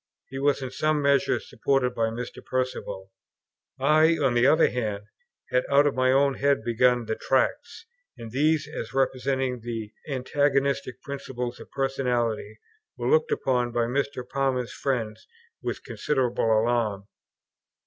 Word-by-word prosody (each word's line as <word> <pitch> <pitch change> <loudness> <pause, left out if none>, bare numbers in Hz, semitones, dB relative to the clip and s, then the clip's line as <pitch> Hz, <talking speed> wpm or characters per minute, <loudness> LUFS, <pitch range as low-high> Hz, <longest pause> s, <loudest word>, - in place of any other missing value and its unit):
He 135 - -5
was 140 -1 +1
in 130 - -5
some 155 +3 +1
measure 140 -1 +2
supported 135 -3 0
by 115 -1 0
Mr. 120 +2 -6
Perceval. 100 -7 -3 0.7
I, 155 +4 +4
on 135 -5 +2
the 120 +2 +4
other 155 +3 +5
hand, 105 -5 -3 0.5
had 125 0 +3
out 140 +1 +5
of 145 - +2
my 130 0 +2
own 140 +1 +3
head 140 0 +2
begun 120 0 +2
the 110 - -1
Tracts; 130 - -1 0.3
and 115 -1 -9
these, 150 +3 +2
as 135 -5 -7
representing 130 -1 0
the 115 -2 -6
antagonist 140 0 0
principle 130 -3 -4
of - - -12
personality, 120 -6 -1 0.4
were - - -1
looked 475 0 +3
upon 125 - 0
by 120 0 +1
Mr. 130 0 -2
Palmer's 130 -2 -1
friends 120 -6 -3 0.3
with - - -4
considerable 130 -6 -1
alarm. 110 -3 +1
130 Hz, 140 wpm, -26 LUFS, 120-140 Hz, 0.7 s, other